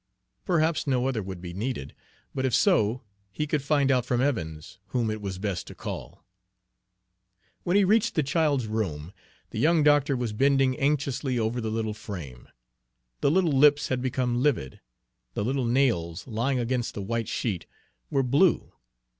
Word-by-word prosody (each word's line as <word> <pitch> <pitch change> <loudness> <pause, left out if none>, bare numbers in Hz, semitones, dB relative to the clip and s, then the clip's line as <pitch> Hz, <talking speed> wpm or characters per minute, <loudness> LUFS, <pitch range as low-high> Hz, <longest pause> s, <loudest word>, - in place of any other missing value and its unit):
Perhaps 165 -4 +1
no 130 -2 +1
other 125 -5 -1
would 95 -2 -7
be 90 -1 -7
needed, 105 - -4 0.4
but 130 - -2
if 130 -2 +2
so, 110 +3 +2 0.3
he 150 +10 -2
could 150 -1 -1
find 140 -1 +2
out 125 -2 +3
from 125 0 0
Evans 90 - -2
whom 120 -4 -1
it 110 0 -5
was 95 -2 -4
best 100 -2 -3
to - - -10
call. - - -7 1.4
When 175 +3 +2
he 205 - +5
reached 210 +3 +2
the 155 - +2
child's 145 -3 +1
room, 95 -7 -3 0.4
the - - -4
young 160 0 +4
doctor 145 -2 +4
was 120 -3 -2
bending 135 +2 +3
anxiously 140 -2 0
over 115 +2 -1
the 110 - -2
little 110 -1 -2
frame. 85 - -8 0.7
The - - +2
little 175 +1 +3
lips 145 +1 +5
had 130 -1 0
become 125 -1 0
livid, 125 - 0 0.6
the 100 - -1
little 130 +1 0
nails, 110 -9 +1
lying 130 +3 -1
against 120 0 -1
the 100 - -4
white 115 +2 -2
sheet, 100 -8 -3 0.4
were 135 - +1
blue. 145 +8 +2
125 Hz, 165 wpm, -27 LUFS, 105-140 Hz, 1.4 s, he